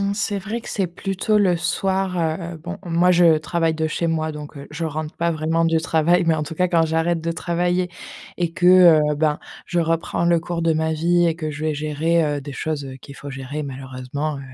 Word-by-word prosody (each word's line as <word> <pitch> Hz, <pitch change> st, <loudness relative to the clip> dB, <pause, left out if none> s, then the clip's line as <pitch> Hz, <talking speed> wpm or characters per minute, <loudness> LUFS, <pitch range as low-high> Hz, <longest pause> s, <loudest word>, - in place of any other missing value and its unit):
C'est 205 Hz, 0 st, -1 dB
vrai 215 Hz, +5 st, -4 dB
que -, -, -11 dB
c'est 195 Hz, -3 st, -1 dB
plutôt 195 Hz, +4 st, -1 dB
le 185 Hz, -4 st, +3 dB
soir, 190 Hz, +1 st, -1 dB
heu, 165 Hz, +1 st, -2 dB
bon, 175 Hz, +5 st, -7 dB
moi 175 Hz, +1 st, +3 dB
je 170 Hz, -3 st, +5 dB
travaille 165 Hz, 0 st, 0 dB
de 160 Hz, 0 st, -1 dB
chez 165 Hz, +2 st, -1 dB
moi, 160 Hz, -1 st, -1 dB
donc, 150 Hz, 0 st, -9 dB
heu, 140 Hz, 0 st, -9 dB
je 170 Hz, -, -3 dB
rentre 155 Hz, 0 st, -4 dB
pas 170 Hz, 0 st, +1 dB
vraiment 160 Hz, +1 st, 0 dB
du 165 Hz, 0 st, +2 dB
travail, 170 Hz, +2 st, +2 dB
mais 165 Hz, -, +4 dB
en 155 Hz, -, -1 dB
tout 155 Hz, +1 st, -6 dB
cas 180 Hz, -, +3 dB
quand 170 Hz, -2 st, +3 dB
j'arrête 165 Hz, +1 st, 0 dB
de 165 Hz, +1 st, -2 dB
travailler 175 Hz, +2 st, 0 dB, 0.5 s
et 175 Hz, -2 st, -1 dB
que, 175 Hz, +1 st, 0 dB
heu, 165 Hz, -5 st, +6 dB
ben, 150 Hz, -1 st, +1 dB, 0.3 s
je 175 Hz, -, -1 dB
reprends 165 Hz, 0 st, 0 dB
le 170 Hz, -1 st, +3 dB
cours 170 Hz, 0 st, -3 dB
de 165 Hz, -, +3 dB
ma 160 Hz, 0 st, 0 dB
vie 175 Hz, +2 st, +2 dB
et 165 Hz, -, -1 dB
que 155 Hz, -2 st, -4 dB
je 150 Hz, +1 st, -5 dB
vais 155 Hz, -1 st, 0 dB
gérer, 155 Hz, +3 st, +1 dB
heu, 145 Hz, -1 st, -1 dB
des 140 Hz, +1 st, -8 dB
choses, 155 Hz, 0 st, -3 dB
heu, 130 Hz, -, -8 dB
qu'il 140 Hz, +1 st, -12 dB
faut 140 Hz, +2 st, -8 dB
gérer 135 Hz, +3 st, -5 dB
malheureusement, 135 Hz, +2 st, -5 dB
heu. -, -, -8 dB
165 Hz, 230 wpm, -22 LUFS, 155-175 Hz, 0.5 s, heu